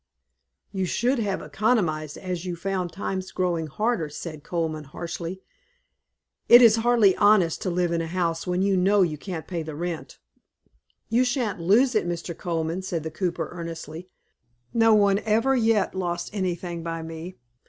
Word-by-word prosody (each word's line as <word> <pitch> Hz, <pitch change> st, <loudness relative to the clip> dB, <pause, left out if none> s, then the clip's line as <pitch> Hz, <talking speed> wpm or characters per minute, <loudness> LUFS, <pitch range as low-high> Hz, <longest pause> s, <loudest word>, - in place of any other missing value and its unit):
"You 190 Hz, -2 st, -1 dB
should 245 Hz, +8 st, +1 dB
have 200 Hz, -4 st, -2 dB
economized 175 Hz, -, 0 dB
as 180 Hz, -2 st, -4 dB
you 180 Hz, -2 st, -4 dB
found 185 Hz, 0 st, -3 dB
times 190 Hz, 0 st, -4 dB
growing 175 Hz, -3 st, -1 dB
harder," 210 Hz, -, -1 dB
said 155 Hz, 0 st, -7 dB
Colman, 160 Hz, -3 st, -3 dB
harshly. 170 Hz, +5 st, -6 dB, 1.1 s
"It 240 Hz, -, +11 dB
is 230 Hz, -2 st, +7 dB
hardly 225 Hz, -4 st, +4 dB
honest 205 Hz, -6 st, +4 dB
to -, -, -1 dB
live 175 Hz, -1 st, 0 dB
in 170 Hz, -1 st, 0 dB
a 165 Hz, -, -3 dB
house 170 Hz, 0 st, -2 dB
when 180 Hz, +1 st, +1 dB
you 195 Hz, -1 st, +2 dB
know 195 Hz, +2 st, +4 dB
you 155 Hz, -4 st, -2 dB
can't 175 Hz, -4 st, -6 dB
pay 175 Hz, -3 st, -4 dB
the 155 Hz, -1 st, -6 dB
rent." 170 Hz, 0 st, -5 dB, 0.9 s
"You 235 Hz, +3 st, +3 dB
sha'n't 240 Hz, -6 st, -1 dB
lose 230 Hz, +10 st, +4 dB
it 215 Hz, -5 st, +1 dB
Mr. 170 Hz, 0 st, -4 dB
Colman," 165 Hz, +1 st, -2 dB
said 175 Hz, -4 st, -3 dB
the 160 Hz, -, -5 dB
cooper, 175 Hz, +1 st, -2 dB
earnestly. 165 Hz, 0 st, -7 dB, 0.6 s
"No 225 Hz, -1 st, +5 dB
one 200 Hz, -1 st, +4 dB
ever 225 Hz, +6 st, +2 dB
yet 225 Hz, -4 st, +2 dB
lost 175 Hz, -2 st, -3 dB
anything 175 Hz, -3 st, -3 dB
by 165 Hz, 0 st, -4 dB
me. 165 Hz, +3 st, -7 dB
180 Hz, 165 wpm, -25 LUFS, 165-205 Hz, 1.1 s, It